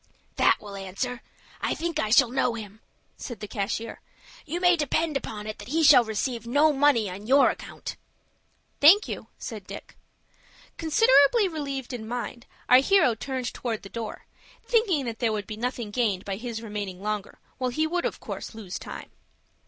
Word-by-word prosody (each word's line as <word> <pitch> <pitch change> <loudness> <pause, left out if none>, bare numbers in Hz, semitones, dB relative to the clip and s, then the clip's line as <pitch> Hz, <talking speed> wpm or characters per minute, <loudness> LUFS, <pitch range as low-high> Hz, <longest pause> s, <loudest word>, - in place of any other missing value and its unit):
"That - - +4
will 205 -1 -9
answer. 200 +6 -4 0.4
I - - 0
think 335 0 -2
I 215 - 0
shall 240 +2 +5
know 250 -2 +1
him," 215 -1 -9 0.4
said 240 -6 -7
the 210 - -6
cashier. 215 +3 -4 0.5
"You 335 +4 -2
may 355 0 +5
depend 310 0 0
upon 210 -6 -4
it 215 0 -6
that - - -9
he 320 +5 +1
shall 280 -5 +8
receive 230 +2 -3
no 295 +5 +4
money 275 -6 +3
on 195 +3 -8
your 275 +3 +6
account." - - -8 0.8
"Thank 350 +9 +7
you," - - -6
said - - -7
Dick. - - -9 0.8
Considerably 390 - +4
relieved 275 -6 -4
in 220 -3 -6
mind, 240 0 -5 0.2
our 250 - +8
hero 325 -3 +4
turned 255 +1 -4
towards 230 -3 -4
the 195 - -9
door, 225 -1 -6 0.4
thinking 405 - +2
that 230 -2 -5
there 235 -3 +1
would 210 -2 -3
be 215 - -6
nothing 240 -1 -3
gained 205 -5 0
by 195 -1 -3
his 230 0 -5
remaining 205 -3 -5
longer, 210 -1 -3 0.2
while 255 -1 0
he 310 +6 0
would 345 +2 -1
of - - -2
course - - -7
lose 200 -5 -6
time. - - -9
245 Hz, 175 wpm, -26 LUFS, 215-290 Hz, 0.8 s, shall